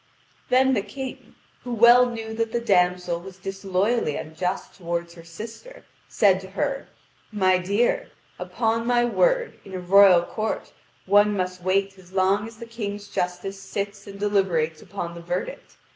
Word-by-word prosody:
Then 265 +1 +4
the 215 - +1
King, 260 +6 -8 0.3
who 245 - -4
well 240 +2 +7
knew 225 -2 -6
that 225 0 -1
the 235 - 0
damsel 180 -5 +1
was 185 +1 -11
disloyally 195 -1 -1
unjust 180 +4 -4
toward 170 -1 -4
her 170 -1 -13
sister, 225 - -10 0.2
said 195 -3 +3
to 190 0 -11
her: 275 +7 -2 0.4
"My 185 -3 +3
dear, 230 - 0 0.3
upon 230 0 -1
my 240 -1 +3
word, - - +1
in 190 - -9
a - - -3
royal 185 -1 +6
court 215 +4 -4 0.3
one 205 +1 +4
must 180 -1 -3
wait 195 +1 0
as 185 0 -18
long 195 +3 +2
as 225 -1 -13
the 235 - -8
king's 205 -3 -6
justice 180 +2 -3
sits 200 +1 -5
and 200 0 -9
deliberates 185 -6 0
upon 175 -4 -6
the 170 - -9
verdict. 175 - -5
200 Hz, 160 wpm, -24 LUFS, 180-230 Hz, 0.4 s, well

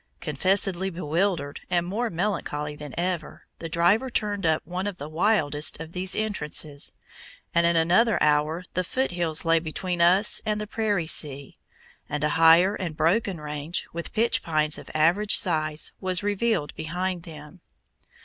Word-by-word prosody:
Confessedly 190 +4 +1
bewildered, 165 -3 -1
and 175 -1 +1
more 225 +6 -2
melancholy 160 -6 -3
than 150 -2 -9
ever, 175 -2 -3 0.2
the 165 - -6
driver 175 +10 +2
turned 205 -6 -1
up 155 -2 +1
one 180 +4 -3
of 200 -3 -5
the 145 - -7
wildest 155 -4 +1
of 160 0 -8
these 185 +1 -2
entrances, 150 -8 -2 0.6
and 170 0 +4
in 170 - +2
another 185 +8 +3
hour 150 +4 +1
the 185 - 0
Foot 260 +7 -1
Hills 170 -3 +1
lay 165 0 +4
between 175 +2 -3
us 185 +5 +4
and 210 -1 -1
the 210 - -3
prairie 210 -5 -1
sea, 140 -3 0 0.5
and 150 +1 -3
a 150 - +2
higher 165 +5 +5
and 170 -6 -5
broken 190 +1 +1
range, 150 +2 -4
with 170 0 -5
pitch 230 +2 +1
pines 155 -2 0
of - - -12
average 175 +7 +4
size, 155 -3 +1
was 185 0 0
revealed 205 -6 0
behind 180 +2 -3
them. 155 +1 -12
170 Hz, 160 wpm, -25 LUFS, 155-195 Hz, 0.6 s, higher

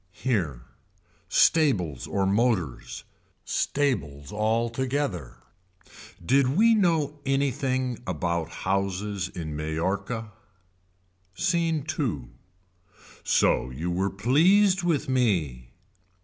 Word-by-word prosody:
Here. 85 - -2 0.7
Stables 95 - +2
or 100 -1 0
motors. 100 - 0 0.4
Stables 75 - -1
altogether. 115 - -1 0.9
Did 135 - +3
we 230 +2 +6
know 160 -8 +1
anything 130 -2 -1
about 85 -2 -2 0.2
houses 100 +1 -1
in 80 -4 -6
Mallorca. 100 +9 -3 1.0
Scene 165 - 0
II. 95 - -2 0.9
So 65 - +2
you 80 +8 -4
were 95 +3 0
pleased 175 - +3
with 170 -5 0
me. 85 - 0
110 Hz, 80 wpm, -26 LUFS, 85-140 Hz, 1.0 s, we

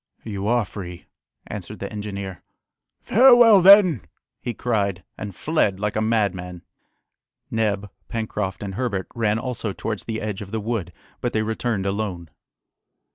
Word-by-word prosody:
"You 100 -2 -4
are 120 -1 +2
free," 90 -3 -8 0.4
answered - - -7
the - - -6
engineer. 100 -3 -5 0.6
"Farewell 240 -4 +7
then!" 185 - +8 0.4
he 120 - -2
cried, 100 -6 -1
and 100 -3 -7
fled 105 - +1
like 105 0 -1
a 110 - +1
madman. 100 -6 -1 0.9
Neb, 105 -3 0 0.2
Pencroft, 105 -4 -3
and 100 -1 -5
Herbert 100 -4 -2
ran 110 -2 +1
also 115 -4 -3
towards 105 0 -4
the 110 -1 -3
edge 105 -1 -4
of 100 - -7
the 110 +2 -2
wood 105 -5 -3 0.3
but 120 - -1
they 110 - +1
returned 110 -2 -2
alone. 95 -5 -3
105 Hz, 140 wpm, -23 LUFS, 100-115 Hz, 0.9 s, then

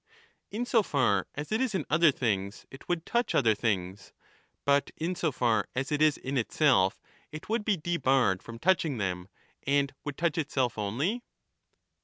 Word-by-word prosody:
touch - - -42 0.4
both. 210 - -5
In 245 - 0
so 235 -2 +3
far 125 - +1
as 145 +4 -6
it 220 - +1
is 250 -6 0
in 170 - -1
other 160 0 +5
things 100 -6 -2
it 135 - -13
would 175 -2 -1
touch 240 +1 0
other 115 -5 +4
things, 100 -3 -3 0.5
but 140 0 +3
in 170 +3 -1
so 170 -3 -1
far 120 -3 +1
as 135 +3 -2
it 150 0 0
is 155 -1 +4
in 135 0 -2
itself 115 -6 +2 0.3
it 155 +6 -9
would 225 -1 0
be 205 -2 +1
debarred 135 - +1
from 115 0 -9
touching 160 -2 +1
them, 90 -3 -3 0.4
and 140 0 +2
would 145 -2 -5
touch 170 -1 0
itself 130 -6 0
only. 135 - -1
140 Hz, 185 wpm, -29 LUFS, 115-170 Hz, 0.5 s, other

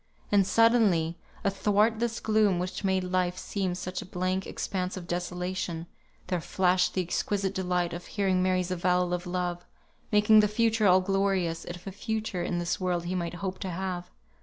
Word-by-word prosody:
And 200 -2 +4
suddenly, 200 -8 +3 0.2
athwart 210 +3 +2
this 235 -1 -1
gloom 215 -4 +3
which 180 +3 -4
made 190 -1 +1
life 180 0 0
seem 185 -1 -2
such 180 0 -4
a - - -8
blank 185 +1 -2
expanse 185 0 -3
of 175 -2 -7
desolation, 180 -1 -3 0.4
there 180 -2 -1
flashed 180 +1 +2
the 185 - +1
exquisite 195 +2 -1
delight 180 -2 0
of 175 +1 -7
hearing 190 -3 +1
Mary's 185 -1 +1
avowal 180 0 +1
of 180 0 -3
love, 175 -1 -2 0.5
making 210 +1 +6
the 210 - +5
future 220 0 +2
all 185 0 +6
glorious, 190 -3 0
if 175 0 -8
a 195 - -5
future 215 -2 -3
in 175 0 -1
this 175 -1 -1
world 180 -2 -1
he 175 - -2
might 175 -1 -2
hope 185 +1 -4
to 190 - -4
have. 180 0 -4
185 Hz, 175 wpm, -28 LUFS, 180-200 Hz, 0.5 s, making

